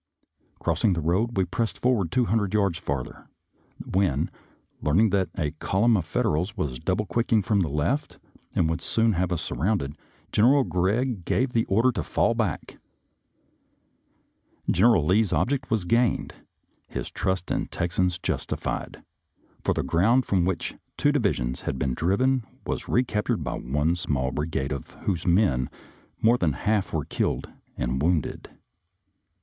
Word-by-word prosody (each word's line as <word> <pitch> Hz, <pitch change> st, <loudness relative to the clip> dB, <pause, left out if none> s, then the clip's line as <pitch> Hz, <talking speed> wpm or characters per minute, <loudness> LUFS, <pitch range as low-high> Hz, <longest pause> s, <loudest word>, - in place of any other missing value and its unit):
Crossing 90 Hz, +5 st, +1 dB
the 85 Hz, -, -1 dB
road, 95 Hz, +9 st, 0 dB
we 95 Hz, -, +3 dB
pressed 110 Hz, +6 st, -2 dB
forward 115 Hz, -10 st, +1 dB
two 125 Hz, -2 st, +2 dB
hundred 105 Hz, -3 st, 0 dB
yards 100 Hz, -4 st, +1 dB
farther, 70 Hz, -6 st, -4 dB, 0.6 s
when, 95 Hz, 0 st, +1 dB, 0.5 s
learning 95 Hz, +8 st, +3 dB
that 95 Hz, -2 st, +1 dB
a 75 Hz, -5 st, 0 dB
column 110 Hz, +9 st, +2 dB
of 90 Hz, -6 st, 0 dB
Fed -, -, -1 dB
erals 90 Hz, +8 st, 0 dB
was 70 Hz, -9 st, -2 dB
double 105 Hz, -, 0 dB
quicking 110 Hz, +3 st, +1 dB
from 100 Hz, +1 st, +2 dB
the 85 Hz, -5 st, +1 dB
left 75 Hz, -, -1 dB, 0.4 s
and 80 Hz, -, +3 dB
would 80 Hz, +1 st, -2 dB
soon 115 Hz, +4 st, +2 dB
have 90 Hz, 0 st, 0 dB
us 85 Hz, -, -1 dB
surrounded. 85 Hz, -8 st, -1 dB, 0.4 s
General 130 Hz, +6 st, +5 dB
Gregg 105 Hz, +3 st, 0 dB
gave 125 Hz, +8 st, +1 dB
the 115 Hz, -1 st, +2 dB
order 115 Hz, +6 st, +3 dB
to 105 Hz, -7 st, -3 dB
fall -, -, +1 dB
back. -, -, -3 dB, 1.9 s
General 100 Hz, -4 st, +4 dB
Lee's 100 Hz, +4 st, +3 dB
ob 130 Hz, -, +1 dB
ject 135 Hz, -2 st, -2 dB
was 110 Hz, -6 st, 0 dB
gained, 115 Hz, +4 st, +1 dB, 0.5 s
his -, -, -5 dB
trust 95 Hz, -2 st, -2 dB
in -, -, +1 dB
the -, -, -6 dB
Texans 90 Hz, +1 st, 0 dB
justified, -, -, -3 dB, 0.6 s
for -, -, +1 dB
the -, -, 0 dB
ground 115 Hz, +9 st, +3 dB
from 90 Hz, -3 st, +2 dB
which 90 Hz, -2 st, -2 dB, 0.2 s
two 145 Hz, -, +3 dB
divisions 100 Hz, -, 0 dB
had -, -, -3 dB
been 65 Hz, -1 st, 0 dB
driven 115 Hz, -, +1 dB, 0.2 s
was -, -, -3 dB
recaptured 115 Hz, -5 st, +1 dB
by -, -, -3 dB
one 75 Hz, +6 st, 0 dB
small 70 Hz, -7 st, -1 dB
bri 75 Hz, +4 st, -2 dB
gade 70 Hz, -3 st, -2 dB
of 70 Hz, -3 st, -5 dB
whose 90 Hz, -4 st, -1 dB
men 85 Hz, -, +3 dB, 0.5 s
more 120 Hz, +2 st, +4 dB
than 80 Hz, -5 st, +2 dB
one -, -, -9 dB
half 105 Hz, -2 st, +1 dB
were 75 Hz, -4 st, -1 dB
killed -, -, -2 dB, 0.3 s
and 65 Hz, +2 st, -1 dB
wounded. 80 Hz, -2 st, 0 dB
95 Hz, 160 wpm, -26 LUFS, 80-115 Hz, 1.9 s, General